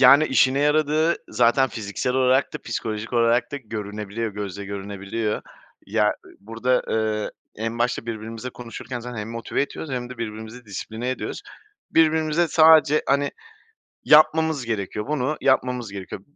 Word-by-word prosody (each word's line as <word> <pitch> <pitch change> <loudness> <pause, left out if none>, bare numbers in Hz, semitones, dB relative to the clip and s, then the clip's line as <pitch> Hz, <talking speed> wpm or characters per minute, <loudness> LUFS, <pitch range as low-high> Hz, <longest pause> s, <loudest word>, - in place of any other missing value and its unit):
Yani, 140 +4 +8
işine 130 0 +3
yaradığı 155 +2 +2
zaten 125 +3 +3
fiziksel 110 +3 -3
olarak 130 +1 +3
da - - -3
psikolojik 110 +1 -4
olarak 120 +2 +2
da - - -2
görünebiliyor 105 -2 -5
gözle 100 -1 -5
görünebiliyor. 100 +2 -4 0.4
Ya - - +2 0.3
burada, 115 +5 0
eee, 110 -1 0 0.3
en 115 +2 -3
başta 120 0 0
birbirimizle 115 +2 -5
konuşurken 120 +1 -7
zaten 125 0 -7
hem 105 +1 -5
motive 115 +4 -2
ediyoruz 145 +1 -6
hem 125 -1 -3
de 125 - -9
birbirimizi 110 +2 -6
disipline 110 +5 -4
ediyoruz. 130 - -4 0.5
Birbirimize 160 +1 +3
sadece, 155 -2 +6
hani, 140 +1 +2 0.7
"Yapmamız 155 -2 +5
gerekiyor, 105 -2 -3
bunu 150 0 0
yapmamız 125 -4 +1
gerekiyor. 95 -1 -7
120 Hz, 135 wpm, -23 LUFS, 110-140 Hz, 0.7 s, Yani